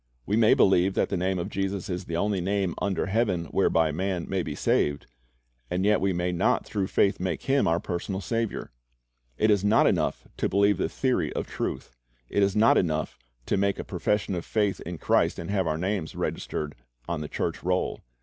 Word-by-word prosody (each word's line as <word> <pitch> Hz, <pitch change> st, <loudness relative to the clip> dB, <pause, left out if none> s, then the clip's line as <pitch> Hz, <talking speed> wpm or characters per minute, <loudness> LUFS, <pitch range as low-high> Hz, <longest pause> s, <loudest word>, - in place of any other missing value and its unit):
We 105 Hz, -, 0 dB
may 110 Hz, -1 st, +5 dB
believe 95 Hz, 0 st, +4 dB
that -, -, +1 dB
the -, -, -1 dB
name 95 Hz, +1 st, 0 dB
of 85 Hz, -, -2 dB
Jesus 95 Hz, -1 st, -2 dB
is 90 Hz, -1 st, -4 dB
the 85 Hz, -, -3 dB
only 100 Hz, 0 st, 0 dB
name 95 Hz, -1 st, 0 dB
under 100 Hz, -2 st, 0 dB
heaven 95 Hz, -4 st, 0 dB
whereby 80 Hz, -1 st, +2 dB
man 90 Hz, +2 st, -2 dB
may -, -, -1 dB
be -, -, -4 dB
saved, 75 Hz, -1 st, +1 dB, 0.6 s
and 90 Hz, +2 st, 0 dB
yet 105 Hz, 0 st, +3 dB
we 95 Hz, 0 st, +2 dB
may 90 Hz, 0 st, -1 dB
not 90 Hz, -, +1 dB
through 100 Hz, -2 st, -2 dB
faith 100 Hz, -, +2 dB
make 90 Hz, -3 st, -2 dB
Him 140 Hz, +1 st, +2 dB
our 85 Hz, +1 st, +2 dB
personal 90 Hz, +2 st, -3 dB
Saviour. 115 Hz, -, -3 dB, 0.7 s
It 110 Hz, -, +3 dB
is 100 Hz, -2 st, +2 dB
not 105 Hz, +2 st, +4 dB
enough -, -, 0 dB
to -, -, 0 dB
believe 100 Hz, -1 st, +3 dB
the -, -, 0 dB
theory -, -, 0 dB
of -, -, -2 dB
truth. -, -, -5 dB, 0.3 s
It 100 Hz, -, +1 dB
is 100 Hz, -1 st, +2 dB
not 110 Hz, +2 st, +5 dB
enough 80 Hz, -7 st, -2 dB, 0.3 s
to -, -, 0 dB
make 100 Hz, 0 st, +1 dB
a -, -, -4 dB
profession 105 Hz, -1 st, -1 dB
of 85 Hz, -2 st, -3 dB
faith 105 Hz, -4 st, 0 dB
in 85 Hz, +1 st, -6 dB
Christ -, -, +2 dB
and 85 Hz, +3 st, -5 dB
have 95 Hz, -4 st, +1 dB
our 80 Hz, 0 st, 0 dB
names 90 Hz, -2 st, -2 dB
registered 75 Hz, -1 st, -3 dB, 0.3 s
on 85 Hz, -3 st, -2 dB
the 75 Hz, -, -4 dB
church -, -, -3 dB
roll. -, -, -1 dB
95 Hz, 205 wpm, -27 LUFS, 85-100 Hz, 0.7 s, may